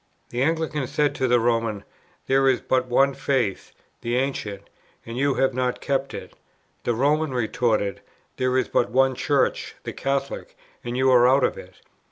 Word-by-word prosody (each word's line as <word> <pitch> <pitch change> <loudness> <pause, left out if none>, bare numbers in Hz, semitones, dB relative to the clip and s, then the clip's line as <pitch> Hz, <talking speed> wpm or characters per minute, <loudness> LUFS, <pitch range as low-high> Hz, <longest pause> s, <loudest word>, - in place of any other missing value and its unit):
The 120 - -2
Anglican 155 -2 0
said 145 +2 +1
to 130 - 0
the 120 0 +4
Roman: 115 -3 0 0.4
"There 135 0 +3
is 130 - +2
but 130 -1 0
One 135 +3 +3
Faith, 130 -7 -1 0.3
the 120 +1 -1
Ancient, 115 -7 -2 0.4
and 115 - -7
you 140 +1 +1
have 135 -1 +2
not 125 0 -1
kept 135 -1 -1
to - - -6
it;" - - -17 0.5
the 120 - +1
Roman 145 +2 +1
retorted: 110 -4 0 0.4
"There 130 0 +1
is 130 - +1
but 120 - +1
One 130 +3 +3
Church, 140 +2 0
the - - -5
Catholic, 140 0 -3 0.3
and 120 +1 -4
you 130 0 +3
are 125 -1 +6
out 135 +1 +4
of - - +1
it." - - -13
130 Hz, 180 wpm, -24 LUFS, 120-135 Hz, 0.5 s, are